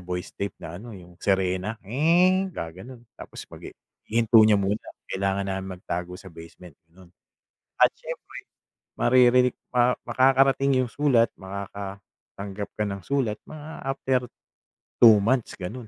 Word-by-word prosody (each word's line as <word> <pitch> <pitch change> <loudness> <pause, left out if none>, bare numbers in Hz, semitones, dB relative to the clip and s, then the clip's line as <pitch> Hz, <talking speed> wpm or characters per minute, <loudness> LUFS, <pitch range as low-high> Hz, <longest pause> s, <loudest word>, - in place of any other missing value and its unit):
voice 90 0 -5
tape 100 0 -5
na 85 +2 -9
ano, 115 -2 -10
eh, 90 - -12
yung 90 0 -19
sirena 95 +2 0
"nge" 175 - +3
gagano'n. 115 - -9
Tapos - - -10
magi - - -11 0.3
ihinto 115 0 +5
niya 110 -1 +6
muna 100 +2 0 0.3
kailangan 100 0 -1
na 95 0 -3
magtago 90 -1 -5
sa 95 -1 -13
basement 85 +1 -13 0.2
gano'n 90 +2 -18 0.7
at - - +7
siyempre - - -9 0.6
maririnig 125 0 +4 0.2
maka 125 0 +3
makakarating 135 0 +3
yung 120 - -8
sulat 135 -6 +3
makakatanggap 100 +1 -8
ka 105 - +1
ng 100 -1 -5
sulat 120 -3 -1
mga 155 -1 -9 0.2
after 130 -1 0 0.8
2 115 -3 +9
months 125 +2 0
gano'n. 110 +6 -7
105 Hz, 135 wpm, -25 LUFS, 95-125 Hz, 0.8 s, 2